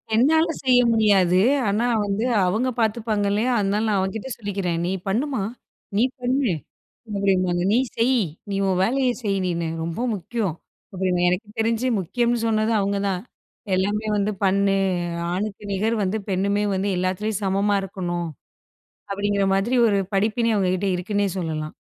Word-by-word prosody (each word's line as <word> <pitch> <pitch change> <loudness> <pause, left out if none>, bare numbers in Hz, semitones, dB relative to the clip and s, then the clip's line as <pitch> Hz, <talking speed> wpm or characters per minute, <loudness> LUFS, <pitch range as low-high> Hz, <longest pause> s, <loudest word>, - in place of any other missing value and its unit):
என்னால 315 +8 +4 0.2
செய்ய 250 -2 +5
முடியாது. 195 -5 +4 0.3
ஆனா, 210 +4 +1 0.2
வந்து 205 +3 -1 0.2
அவுங்க 220 +8 +1
பார்த்துப்பாங்க 220 -2 0
இல்லயா! 230 +5 +1
அதனால 205 +2 0
நான் 205 - +2
அவன்கிட்ட 205 +6 -3
சொல்லிக்கிறேன். 195 -5 -2
நீ 180 - -1 0.2
பண்ணுமா, 250 +4 0 0.6
நீ 225 - +4 0.2
பண்ணு 250 -1 +1 0.6
அப்பிடிம்பாங்க. 185 -3 +1
நீ - - +4 0.2
செய். 245 +1 +3 0.3
நீ - - -1
உன் 185 -1 +1
வேலைய 260 +5 +2
செய் 200 -2 0
நீனு 170 -2 -1 0.2
ரொம்ப 165 +5 -4 0.2
முக்கியம். 200 -3 -3 0.4
அப்பிடின்னு 180 -1 +1
எனக்கு 180 +5 -2
தெரிஞ்சு 230 +2 +1
முக்கியம்ன்னு 240 +6 0
சொன்னது 220 0 +1
அவுங்க 200 0 0
தான். 185 -2 -2 0.5
"எல்லாமே 205 +3 0
வந்து 205 +1 +1
பண்ணு, 195 +1 +2 0.6
ஆணுக்கு 205 +2 -4
நிகர் 220 +4 0
வந்து 195 +3 -1
பெண்ணுமே 200 +2 +1
வந்து 195 +2 -1
எல்லாத்துலயும் 190 +3 -1
சமமா 200 +1 +1
இருக்கணும்." 175 -3 -3 0.8
அப்பிடிங்கிற 200 0 0
மாதிரி 215 +6 +1
ஒரு 200 -2 +2 0.2
படிப்பினே 225 +3 +1
அவுங்க 190 -3 +1
கிட்ட 195 +2 -2
இருக்குன்னே 205 +3 0
சொல்லலாம். 155 -3 -3
200 Hz, 145 wpm, -23 LUFS, 190-225 Hz, 0.8 s, செய்ய